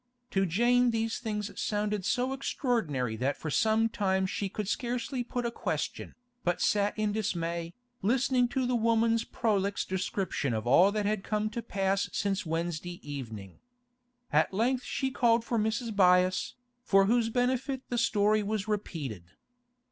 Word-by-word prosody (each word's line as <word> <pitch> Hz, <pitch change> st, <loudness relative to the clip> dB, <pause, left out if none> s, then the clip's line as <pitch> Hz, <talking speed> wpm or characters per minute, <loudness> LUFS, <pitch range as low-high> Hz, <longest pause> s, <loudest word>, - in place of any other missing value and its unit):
To 195 Hz, 0 st, +2 dB
Jane 240 Hz, +7 st, +3 dB
these 225 Hz, -1 st, -1 dB
things 210 Hz, -2 st, -3 dB
sounded 210 Hz, -2 st, -1 dB
so 255 Hz, +2 st, +1 dB
extraordinary 165 Hz, -, -1 dB
that 135 Hz, +5 st, -1 dB
for 155 Hz, -, -5 dB
some 220 Hz, +4 st, +3 dB
time 190 Hz, -3 st, 0 dB
she 195 Hz, +1 st, -2 dB
could 210 Hz, +1 st, -4 dB
scarcely 245 Hz, +3 st, -2 dB
put 245 Hz, 0 st, -3 dB
a 235 Hz, -, -1 dB
question, -, -, -4 dB, 0.3 s
but 175 Hz, 0 st, 0 dB
sat 205 Hz, 0 st, +1 dB
in 215 Hz, -1 st, +1 dB
dismay, 170 Hz, -5 st, -2 dB, 0.3 s
listening 250 Hz, +3 st, +2 dB
to 255 Hz, +1 st, -1 dB
the 250 Hz, -, 0 dB
woman's 230 Hz, 0 st, +2 dB
prolix 205 Hz, -4 st, 0 dB
description 185 Hz, -, -2 dB
of 110 Hz, 0 st, -3 dB
all 175 Hz, +11 st, +6 dB
that 210 Hz, 0 st, -1 dB
had 210 Hz, -1 st, 0 dB
come 215 Hz, 0 st, -1 dB
to 235 Hz, +1 st, -3 dB
pass 195 Hz, -3 st, 0 dB
since 195 Hz, -3 st, -1 dB
Wednesday 170 Hz, +1 st, -3 dB
evening. 115 Hz, -10 st, -7 dB, 0.7 s
At 155 Hz, +1 st, +3 dB
length 245 Hz, +6 st, 0 dB
she 265 Hz, -1 st, -2 dB
called 230 Hz, -2 st, +2 dB
for 235 Hz, -2 st, 0 dB
Mrs. 220 Hz, +2 st, -1 dB
Byass, 185 Hz, -1 st, +3 dB, 0.3 s
for 195 Hz, -5 st, +4 dB
whose 230 Hz, +2 st, +2 dB
benefit 255 Hz, +2 st, 0 dB
the 240 Hz, -, 0 dB
story 215 Hz, -2 st, +3 dB
was 210 Hz, 0 st, -2 dB
repeated. 150 Hz, -, -4 dB
210 Hz, 155 wpm, -29 LUFS, 185-235 Hz, 0.7 s, all